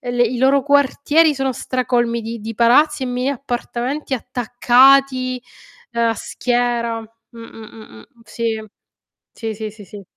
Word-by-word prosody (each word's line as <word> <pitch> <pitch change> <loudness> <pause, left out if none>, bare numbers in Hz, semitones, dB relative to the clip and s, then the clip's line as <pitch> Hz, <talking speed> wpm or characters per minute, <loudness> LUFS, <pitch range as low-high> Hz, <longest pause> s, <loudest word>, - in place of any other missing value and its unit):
e 245 -4 -5
le 245 - +2
i 240 +1 -2
loro 270 +2 +3
quartieri 285 +2 +3
sono 270 -1 -1
stracolmi 240 -2 -1
di 225 +1 -6
di 225 +2 -6
palazzi 270 +6 +3
e - - -1
mini 250 +1 -2
appartamenti 265 +1 -3
attaccati, 255 +2 +3 0.5
ehm, 235 0 +1
a 225 - 0
schiera 240 0 -1
mh, 225 +1 -17
mh, 225 -1 -11
mh, 215 - -13
mh, 110 - -14 0.2
sì. 220 -1 -4 0.7
Sì, 225 -2 -5
sì, 215 0 -6
sì, 210 0 -14
sì. 200 +1 -11
245 Hz, 155 wpm, -19 LUFS, 230-265 Hz, 0.7 s, loro